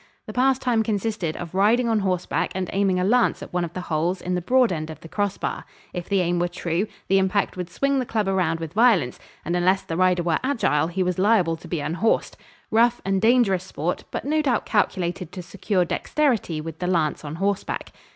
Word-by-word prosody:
The - - -8
pastime 255 -2 +2
consisted 210 -6 -2
of 175 -1 -7
riding 220 +6 +3
on 225 -2 +2
horseback 185 -3 -1
and 185 -2 -3
aiming 195 -2 +2
a - - +1
lance 240 +5 +2
at - - -11
one 180 -1 0
of 170 -1 -5
the 185 - -4
holes 175 +2 -1
in 180 - -3
the 180 - 0
broad 250 +5 +3
end 155 -2 -3
of 160 - -8
the - - -10
crossbar. 205 +3 -2 0.3
If 175 -1 -5
the 195 -2 +2
aim 175 0 0
were 175 - +1
true, 175 +3 -2 0.2
the 195 0 +4
impact 195 +1 0
would 180 -1 -5
swing 275 +8 0
the 255 - -1
club 215 -3 -1
around 180 -4 +1
with 165 -1 -6
violence, 210 - +3 0.3
and 170 - -1
unless 185 +2 +2
the 165 - -4
rider 180 0 +2
were 170 -2 +1
agile 225 - +1
he 185 +2 -1
was 180 0 -1
liable 190 -5 +3
to 160 - -13
be 170 -4 -2
unhorsed 175 +10 0 0.4
rough 235 +2 +3
and 195 -1 +1
dangerous 220 -5 +3
sport, 175 -2 -3
but - - -5
no 310 +2 +2
doubt 260 -6 0
calculated 185 -4 -1
to 180 - -6
secure 185 +1 -1
dexterity 230 - 0
with 160 0 -7
the 180 - -2
lance 165 -5 0
on 150 +1 -6
horseback. 195 +3 -2
185 Hz, 215 wpm, -24 LUFS, 175-220 Hz, 0.4 s, the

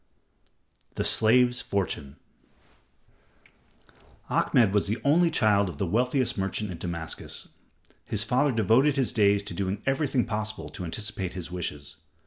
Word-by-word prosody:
The - - -1
Slave's 125 +2 +3
Fortune 90 -8 -3 2.2
Ahmed 110 -6 +3
was 105 -1 +2
the 110 +4 -1
only 165 +4 +4
child 105 - +2
of 80 - -8
the 95 - -1
wealthiest 125 - 0
merchant 95 +1 -2
in 85 - -7
Damascus. 85 -2 -4 0.5
His 105 0 -1
father 130 +5 +2
devoted 120 +6 +3
his 135 -4 +1
days 100 -2 +3
to 100 - -6
doing 100 0 -2
everything 135 -2 +1
possible 110 -1 -4
to 90 - -7
anticipate 95 0 -4
his 90 -2 -7
wishes. 75 -4 -6
105 Hz, 130 wpm, -27 LUFS, 95-125 Hz, 2.2 s, only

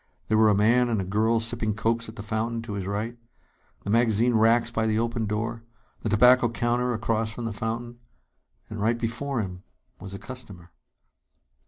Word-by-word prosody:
There 110 - +3
were 110 -1 +6
a 105 - +4
man 120 +4 +3
and 115 -3 0
a - - -1
girl 110 +5 +1
sipping 115 -2 -1
cokes 115 +1 0
at 110 - -11
the 100 - -7
fountain, 115 +2 -2
to 110 -2 -6
his 100 -2 -4
right; 110 +4 -3 0.6
the 100 - -3
magazine 115 +1 +3
racks 115 +1 +3
by 110 -1 0
the 110 0 +1
open 115 -1 -1
door; 115 +2 -2 0.4
the 110 - -3
tobacco 125 +3 +5
counter 120 +2 0
across 115 -1 -1
from 115 +1 -6
the 115 - -3
fountain. 115 +3 -4 0.7
And 110 - -7
right 115 +3 +2
before 120 +3 -2
him 90 -3 -6 0.4
was 100 0 -8
a - - -5
customer. 100 -6 -10
115 Hz, 185 wpm, -26 LUFS, 110-120 Hz, 0.7 s, were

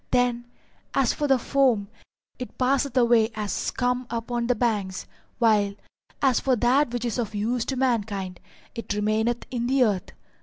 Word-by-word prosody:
Then, 245 -1 +1 0.5
as 265 -4 +3
for 295 - -1
the 270 -1 +4
foam, 250 -5 +2 0.5
it 250 - -7
passeth 265 0 +1
away 235 -2 +4
as 210 -3 -3
scum 250 0 -1
upon 235 0 -2
the 250 - +2
banks, 205 -6 -1 0.3
while, 210 -4 +3 0.5
as 260 -3 +4
for 260 -2 +2
that 245 +3 +2
which 245 0 -3
is 240 +1 -2
of 220 -3 -3
use 230 +3 -1
to 265 - -2
mankind, 205 -8 -1 0.3
it 230 - -6
remaineth 220 +3 0
in 240 -1 -2
the 265 0 +3
earth. 200 -6 -1
240 Hz, 160 wpm, -25 LUFS, 215-250 Hz, 0.5 s, the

